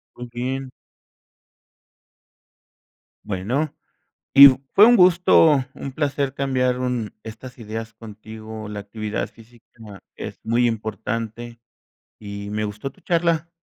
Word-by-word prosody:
¿Con 125 0 -8
quién? 130 +2 -4 2.6
Bueno, 120 +11 -2 0.6
y 140 0 +11 0.2
fue 210 - +8
un 240 -1 +6
gusto, 170 -5 +5
un 135 - -7
placer 140 -2 -1
cambiar 130 -2 0
un 125 -4 -3
estas 120 +4 -10
ideas 110 0 -7
contigo, 110 0 -10
la 105 -1 -6
actividad 105 +1 -4
física 115 +1 -19 0.5
es - - -8
muy 120 +2 +2
importante, 115 +1 -4 0.6
y 100 -1 -7
me 105 +1 -2
gustó 105 +5 -5
tu - - -23
charla. 170 -1 0
120 Hz, 110 wpm, -22 LUFS, 110-135 Hz, 2.6 s, y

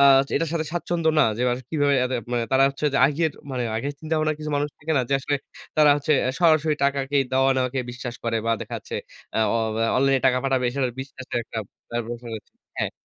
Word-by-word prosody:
আ - - +6 0.3
এটার 165 +3 0
সাথে 160 -2 0
স্বাচ্ছন্দ্য 170 -1 0
না। 150 - +6
যে - - -5
আসলে 125 0 -5
কিভাবে 145 -3 +2
এতে 130 +1 -1 0.2
মানে 120 -1 +1
তারা 135 0 +5
হচ্ছে 140 +2 -6
যে 140 - +2
আগের 155 +3 +1 0.2
মানে 130 -2 -2
আগের 140 +6 -2
চিন্তাভাবনার 155 -1 0
কিছু 155 0 -5
মানুষ 145 +1 0
থাকে 160 +2 -2
না? 130 - +3
যে 140 - +2
আসলে 145 +2 -1 0.4
তারা 150 -1 +6
হচ্ছে 145 +1 0
অ্যা 130 - +1
সরাসরি 155 -2 +4
টাকা 140 0 +2
কেই 140 -1 +3
দেওয়া-নেওয়াকে 130 0 +2
বিশ্বাস 125 0 -6
করে 115 -1 0
বা 115 - +3
দেখাচ্ছে - - -7 0.4
অ - - +2 0.2
অ - - +1 0.4
অনলাইনে 135 0 +3
টাকা 125 -1 +3
পাঠাবে 135 -2 +1
সেটার 130 -3 0
বিশ্বাসের 130 -1 -12
একটা 115 - -6 0.3
ব্যাপার-সেপার 120 0 -4
রয়েছে, 110 - -10 0.3
হ্যাঁ। - - 0
135 Hz, 205 wpm, -24 LUFS, 125-150 Hz, 0.4 s, আ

